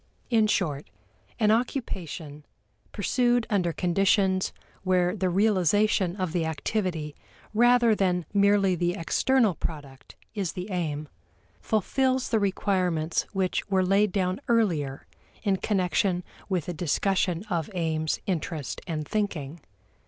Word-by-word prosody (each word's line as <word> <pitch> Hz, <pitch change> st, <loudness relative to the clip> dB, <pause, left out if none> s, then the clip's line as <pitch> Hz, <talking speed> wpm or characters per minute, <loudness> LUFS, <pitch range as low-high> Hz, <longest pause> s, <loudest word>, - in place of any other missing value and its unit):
In 220 Hz, -2 st, +4 dB
short, 155 Hz, -9 st, -1 dB, 0.5 s
an 215 Hz, -2 st, +4 dB
occupation, 180 Hz, -, -3 dB, 0.5 s
pursued 240 Hz, +3 st, +1 dB
under 180 Hz, -4 st, +2 dB
conditions 190 Hz, +2 st, +2 dB, 0.3 s
where 180 Hz, 0 st, +2 dB
the 190 Hz, -3 st, 0 dB
realization 195 Hz, -1 st, +2 dB
of 185 Hz, -4 st, -2 dB
the 175 Hz, -2 st, +1 dB
activity 160 Hz, -1 st, -2 dB, 0.4 s
rather 240 Hz, 0 st, +5 dB
than 180 Hz, -4 st, +1 dB
merely 200 Hz, -1 st, +4 dB
the 175 Hz, 0 st, 0 dB
external 220 Hz, +5 st, +2 dB
product 145 Hz, -5 st, -7 dB, 0.2 s
is 195 Hz, -6 st, -2 dB
the 185 Hz, +3 st, -6 dB
aim, 155 Hz, -4 st, -2 dB, 0.5 s
fulfills 255 Hz, -, 0 dB
the 225 Hz, -, +2 dB
requirements 185 Hz, -5 st, 0 dB
which 190 Hz, 0 st, -1 dB
were 190 Hz, -1 st, +2 dB
laid 200 Hz, +2 st, +3 dB
down 185 Hz, +3 st, -1 dB
earlier 170 Hz, -, +1 dB, 0.4 s
in 195 Hz, -3 st, +2 dB
connection 185 Hz, -2 st, 0 dB, 0.3 s
with 180 Hz, -5 st, 0 dB
the 175 Hz, -, -4 dB
discussion 180 Hz, +2 st, 0 dB
of 170 Hz, 0 st, -1 dB
aims, 160 Hz, -2 st, -1 dB
interest, 160 Hz, -5 st, -3 dB
and 155 Hz, -3 st, -3 dB
thinking. 170 Hz, -8 st, -2 dB
185 Hz, 120 wpm, -27 LUFS, 165-205 Hz, 0.5 s, rather